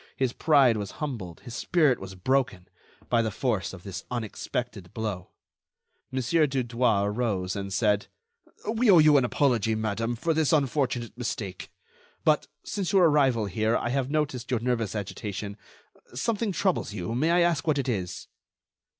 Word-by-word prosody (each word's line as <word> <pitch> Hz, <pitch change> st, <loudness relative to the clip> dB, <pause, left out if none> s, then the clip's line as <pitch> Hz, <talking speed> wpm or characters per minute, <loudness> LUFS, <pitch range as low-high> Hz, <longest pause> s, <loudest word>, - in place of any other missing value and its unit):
His 130 Hz, -2 st, 0 dB
pride 140 Hz, -7 st, +4 dB
was 100 Hz, -2 st, -5 dB
humbled, 110 Hz, -, -5 dB
his 120 Hz, -, -9 dB
spirit 150 Hz, -1 st, +2 dB
was 95 Hz, 0 st, -8 dB
broken, 100 Hz, -3 st, 0 dB, 0.4 s
by 120 Hz, -1 st, +3 dB
the 110 Hz, -, 0 dB
force 105 Hz, -5 st, -1 dB
of 90 Hz, -2 st, -11 dB
this 95 Hz, -2 st, -6 dB
unexpected 115 Hz, -4 st, -4 dB
blow. 105 Hz, -5 st, -4 dB, 0.8 s
Mon. 130 Hz, 0 st, -1 dB
Dudouis 125 Hz, -7 st, +2 dB
arose, 105 Hz, -4 st, -1 dB
and 100 Hz, -1 st, -4 dB
said: 105 Hz, +1 st, +1 dB, 0.6 s
"We 225 Hz, +2 st, +2 dB
owe 185 Hz, -, +8 dB
you 150 Hz, -2 st, +7 dB
an 130 Hz, -, +3 dB
apology, 120 Hz, -5 st, +1 dB
madame, 110 Hz, +2 st, -1 dB
for 165 Hz, +8 st, 0 dB
this 160 Hz, -2 st, +2 dB
unfortunate 135 Hz, -5 st, 0 dB
mistake. 100 Hz, -6 st, -4 dB, 0.5 s
But, -, -, +3 dB, 0.2 s
since 195 Hz, -4 st, -3 dB
your 185 Hz, -4 st, +6 dB
arrival 135 Hz, -7 st, +3 dB
here, 110 Hz, +4 st, +1 dB
I 120 Hz, -, -2 dB
have 135 Hz, +1 st, 0 dB
noticed 145 Hz, -4 st, -1 dB
your 125 Hz, -3 st, +1 dB
nervous 115 Hz, -4 st, -1 dB
agitation. 100 Hz, 0 st, -5 dB, 0.6 s
Something 215 Hz, -, 0 dB
troubles 185 Hz, -, 0 dB
you; 90 Hz, +1 st, -4 dB
may 145 Hz, +7 st, +1 dB
I 175 Hz, +1 st, +4 dB
ask 170 Hz, -2 st, +1 dB
what 150 Hz, -2 st, +3 dB
it 135 Hz, -2 st, -1 dB
is?" 95 Hz, -7 st, -3 dB
120 Hz, 160 wpm, -27 LUFS, 105-145 Hz, 0.8 s, owe